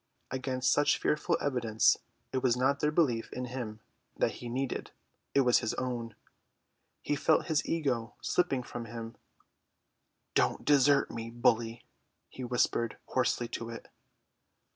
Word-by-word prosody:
Against 130 -1 +1
such 145 - +3
fearful 150 - +1
evidence 120 -6 +3 0.4
it 130 - 0
was 125 -2 +2
not 135 +3 +2
their 150 - +2
belief 145 -8 +1
in 125 - -4
him 120 -4 -6 0.4
that - - +2
he 120 - -5
needed, 130 +2 -2 0.5
it 140 - +6
was 125 -2 +5
his 110 - -2
own. 120 -4 -3 0.9
He 145 - 0
felt 155 +2 +3
his 155 -3 +1
ego 130 -8 -1
slipping 140 -8 +1
from 120 -1 -6
him. 115 0 -7 1.2
"Don't - - +1
desert 145 -1 +4
me, 115 0 -5
bully," 115 0 +1 0.4
he 130 - -8
whispered 120 -2 0
hoarsely 120 - +1
to 115 -1 -5
it. 115 - -9
125 Hz, 140 wpm, -31 LUFS, 115-135 Hz, 1.2 s, it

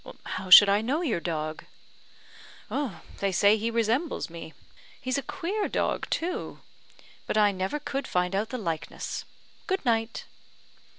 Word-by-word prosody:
"How 185 0 -5
should 200 +3 +11
I 200 +1 +3
know 280 +10 -1
your 240 - 0
dog?" 155 -2 -4 1.5
"They 200 -1 0
say 200 +3 +5
he 220 +1 -1
resembles 230 - 0
me. 165 -2 -9 0.4
He's 255 +2 -1
a - - -4
queer 355 +9 -3
dog, - - -1
too; 350 +2 -3 0.7
but - - -1
I 210 -1 +5
never 190 +7 -2
could 280 -2 -4
find 180 +1 0
out 210 +3 -1
the 255 - -4
likeness. 165 -8 -4 0.4
Good 380 -5 -1
night!" 225 -1 0
220 Hz, 140 wpm, -27 LUFS, 185-275 Hz, 1.5 s, should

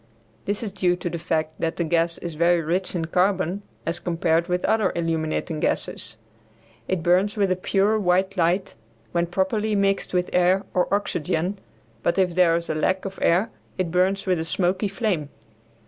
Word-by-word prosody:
This 205 +3 -2
is 210 - -3
due 185 -2 +1
to 175 -1 -4
the 170 - -4
fact 155 -2 -2
that 165 0 0
the 170 - -1
gas 165 +1 +1
is 170 -2 -6
very 170 +2 +3
rich 175 +4 -1
in 165 -2 -1
carbon 185 +2 +1 0.2
as 170 +1 -2
compared 170 -1 +1
with 180 0 0
other 215 -3 +2
illuminating 160 -1 -1
gases. 110 - -2 0.7
It 185 -3 -1
burns 185 +4 +2
with 200 -2 +2
a - - +3
pure 200 +3 +1
white 190 0 +1
light 180 +2 +1 0.4
when 170 0 +1
properly 205 +4 0
mixed 195 0 +1
with 180 -1 0
air 180 +2 +3
or 180 - +1
oxygen, 185 -1 -1 0.4
but 170 - 0
if 185 -2 +2
there 170 -2 +4
is 170 0 -2
a - - -1
lack 185 +5 0
of 195 0 -6
air 180 +6 +3 0.3
it 185 -3 -1
burns 190 +2 +1
with 185 -3 +1
a - - -1
smoky 180 +5 0
flame. 190 -7 -1
180 Hz, 180 wpm, -24 LUFS, 170-195 Hz, 0.7 s, there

